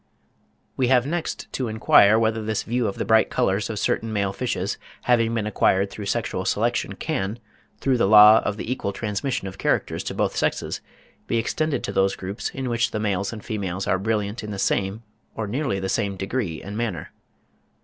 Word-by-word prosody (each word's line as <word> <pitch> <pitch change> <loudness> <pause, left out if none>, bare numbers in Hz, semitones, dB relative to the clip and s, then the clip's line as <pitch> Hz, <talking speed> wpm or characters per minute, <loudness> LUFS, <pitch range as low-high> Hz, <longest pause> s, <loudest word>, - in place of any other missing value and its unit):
We 130 - +2
have 125 -1 +4
next 165 +3 -3
to 130 - -2
inquire 110 -1 +5
whether 110 0 +1
this 110 -1 -2
view 120 0 0
of 100 - -3
the - - -3
bright 110 -1 +4
colours 100 +3 0
of 110 - -4
certain 110 +2 0
male 100 -2 0
fishes 125 +3 -2 0.2
having 115 -2 +2
been 110 -2 -1
acquired 100 -1 +2
through 105 -2 -6
sexual - - -1
selection - - 0
can, 95 +4 -2 0.4
through 130 -3 +1
the 95 - +3
law 105 +1 +9
of 105 - -3
the 110 - -4
equal 100 -6 -2
transmission 110 +2 -2
of 95 0 -9
characters - - 0
to - - -4
both - - 0
sexes, - - -1 0.5
be 115 - 0
extended 140 +4 -1
to - - -3
those 95 0 +2
groups 95 +4 -4
in 135 -1 -5
which 120 -1 +1
the 110 - -3
males 100 -2 -1
and 110 -3 -9
females 95 -4 -3
are 95 - +1
brilliant 105 +2 -2
in 105 - -6
the 100 - -5
same, 100 +3 0 0.3
or 110 - -3
nearly 115 -1 -1
the 95 - -3
same 100 +1 -1
degree 95 -4 -3
and 100 +2 -7
manner. 110 -9 -3
110 Hz, 195 wpm, -24 LUFS, 100-115 Hz, 0.5 s, law